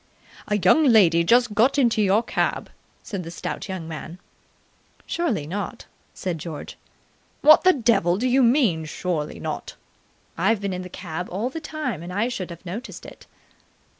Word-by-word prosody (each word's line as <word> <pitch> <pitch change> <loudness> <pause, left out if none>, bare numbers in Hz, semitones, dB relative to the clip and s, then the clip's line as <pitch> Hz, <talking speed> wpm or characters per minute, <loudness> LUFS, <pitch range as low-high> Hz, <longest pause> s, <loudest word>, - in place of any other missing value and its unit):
"A 210 - +1
young 200 - +4
lady 185 -9 +5
just 240 +4 +3
got 240 +7 +3
into 235 -5 +3
your 205 +3 +3
cab," - - -2 0.3
said 195 -3 -5
the 165 - -8
stout 175 - -6
young 185 -4 -5
man. 160 +2 -7 0.9
"Surely 260 - -1
not?" 190 +5 -5 0.3
said 175 -4 -3
George. 155 -1 -7 0.7
"What 310 +1 +7
the 370 - +6
devil 200 - +2
do 250 +5 0
you 260 +2 +3
mean 230 - +3
surely 155 -1 -3
not?" - - -5 0.6
"I've 200 +5 +2
been 200 -1 -3
in 180 - -4
the 180 - -8
cab 180 -1 -6
all 215 +8 -3
the 325 - -6
time, 295 - -4
and 175 +1 -7
I 210 +6 0
should 185 -7 -5
have 170 +1 -11
noticed 210 +9 -7
it." - - -13
200 Hz, 165 wpm, -23 LUFS, 175-245 Hz, 0.9 s, What